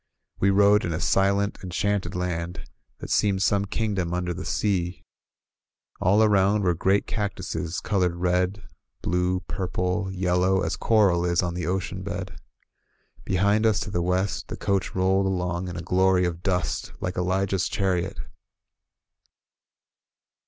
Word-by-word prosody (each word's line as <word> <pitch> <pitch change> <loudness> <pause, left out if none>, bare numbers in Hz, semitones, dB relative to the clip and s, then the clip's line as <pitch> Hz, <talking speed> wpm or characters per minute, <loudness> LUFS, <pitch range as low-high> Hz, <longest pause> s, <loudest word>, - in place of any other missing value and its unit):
We 100 - +3
rode 100 +2 +5
in 85 - -2
a 80 - -2
silent, 100 +2 +1
enchanted 95 0 -1
land, 90 -1 -3 0.3
that - - -8
seemed 100 -2 +2
some 100 0 +2
kingdom 100 -5 -2
under 90 0 -2
the 95 +2 -6
sea. 95 -4 -1 1.0
All 100 +4 +3
aroimd 100 0 +3
were 90 -2 +3
great 95 +4 +1
cactuses 95 -5 -3
colored 90 -4 0
red, 90 +3 0 0.4
blue, 90 +1 0
purple, 90 +1 -2
yellow, 90 0 +1
as 80 +1 -1
coral 95 -3 +3
is 85 +1 +1
on 90 -1 -2
the 90 0 -3
ocean 95 +1 -2
bed. - - -6 0.9
Behind 100 +3 +2
us, 110 -2 +3
to 105 - -4
the 85 - 0
west, 90 +3 -1
the - - -6
coach 100 -2 -1
rolled 95 +1 +2
along 90 -1 -2
in 90 - -6
a 85 - -5
glory 90 +1 +3
of 85 -1 -3
dust 90 -1 -1
like 90 - -3
Elijah's 95 +1 0
chariot. 95 -1 -1
95 Hz, 140 wpm, -25 LUFS, 90-100 Hz, 1.0 s, rode